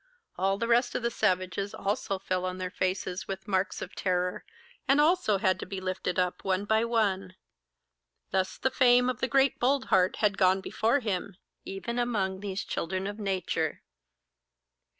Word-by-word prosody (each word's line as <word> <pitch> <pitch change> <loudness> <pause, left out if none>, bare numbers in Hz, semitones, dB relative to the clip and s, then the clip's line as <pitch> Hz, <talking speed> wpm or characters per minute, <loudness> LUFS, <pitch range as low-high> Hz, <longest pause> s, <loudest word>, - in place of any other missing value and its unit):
All 195 +2 +1
the 230 +3 -2
rest 240 +1 +2
of - - -1
the 235 - +1
savages 185 -1 0
also 200 -1 -1
fell 185 -1 -2
on 185 0 -3
their 185 -1 -4
faces 185 0 -2
with 195 +1 -6
marks 190 -1 0
of - - -9
terror, 180 -1 -1 0.4
and 275 +1 +4
had 295 - +6
also 330 - +2
to 185 -1 +1
be 195 0 -5
lifted 185 -1 -3
up 180 -1 0
one 190 +1 0
by 220 +2 +2
one. 195 -5 0 1.0
Thus 190 -1 0
the 265 - 0
fame 250 -1 +5
of 245 - -9
the - - 0
great 270 0 +3
Boldheart 245 -8 +2
had 205 -2 +1
gone 185 +1 +4
before 230 +7 +1
him, 200 -3 -3 0.3
even 235 +5 -4
among 200 -6 0
these 200 0 -4
children 185 +3 -3
of 205 +2 -5
Nature. 185 -6 -2
195 Hz, 170 wpm, -29 LUFS, 185-230 Hz, 1.0 s, had